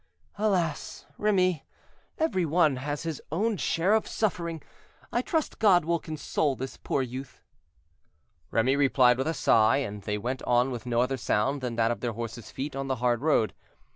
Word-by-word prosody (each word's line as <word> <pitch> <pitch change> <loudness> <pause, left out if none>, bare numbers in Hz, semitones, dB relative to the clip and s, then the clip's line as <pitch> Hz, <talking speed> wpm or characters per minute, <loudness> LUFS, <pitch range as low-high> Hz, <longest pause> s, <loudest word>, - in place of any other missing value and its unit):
"Alas! 180 -8 -1
Remy, 185 -7 +2 0.5
every 315 - +1
one 155 -3 +3
has 145 +3 -4
his 165 -3 -4
own 210 +7 +1
share 180 +1 +1
of 220 - +2
suffering. 170 -7 -2 0.5
I 240 - +1
trust 315 +3 -2
God 185 -7 +5
will 170 0 +1
console 155 -2 -1
this 130 +1 -6
poor 135 - -1
youth." 130 +1 -7 1.1
Remy 125 +4 +2
replied 130 -3 +4
with 135 - 0
a 160 - -1
sigh, 110 +2 +4
and 105 -7 -4
they 105 +1 -2
went 125 +5 -3
on 125 +2 +2
with 120 -1 -6
no 120 0 +2
other 130 +2 0
sound 130 +4 0
than 125 -2 -3
that 115 0 +2
of 120 - -3
their 120 -2 -2
horses' 115 0 -6
feet 135 +1 -5
on 135 0 -3
the 135 - 0
hard 120 -1 0
road. 145 -8 +2
135 Hz, 175 wpm, -27 LUFS, 120-170 Hz, 1.1 s, God